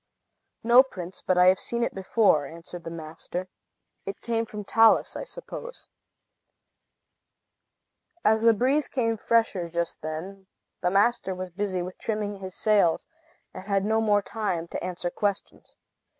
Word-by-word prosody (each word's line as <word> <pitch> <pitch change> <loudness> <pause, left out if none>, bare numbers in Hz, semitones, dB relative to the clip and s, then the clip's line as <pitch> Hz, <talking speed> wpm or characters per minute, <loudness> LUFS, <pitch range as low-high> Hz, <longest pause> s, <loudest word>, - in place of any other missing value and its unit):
"No, 240 +2 +8
prince; 185 -9 -7
but 185 - +1
I 180 - +6
have 185 0 +5
seen 235 0 -1
it - - -1
before," 190 -6 +2
answered 170 +2 -10
the - - -4
master. 165 +3 -6 0.5
"It 195 - -6
came 230 -1 -1
from 210 -1 -7
Talus, 225 +2 +4
I - - -4
suppose." - - -8 2.4
As 220 0 +4
the 230 0 +5
breeze 270 +6 +2
came 230 -4 0
fresher 220 -6 +1
just 170 -1 -3
then, 180 +5 -6 0.3
the 180 - +2
master 200 0 +2
was 185 0 -6
busy 185 -1 -2
with 180 +1 -8
trimming 210 -2 -3
his 190 -1 -8
sails, 205 -6 +3 0.5
and 185 - -9
had 200 -1 +1
no 220 +1 +2
more 205 -2 +3
time 200 -6 -3
to - - -5
answer 180 -1 -3
questions. 205 0 -3
195 Hz, 150 wpm, -26 LUFS, 180-225 Hz, 2.4 s, No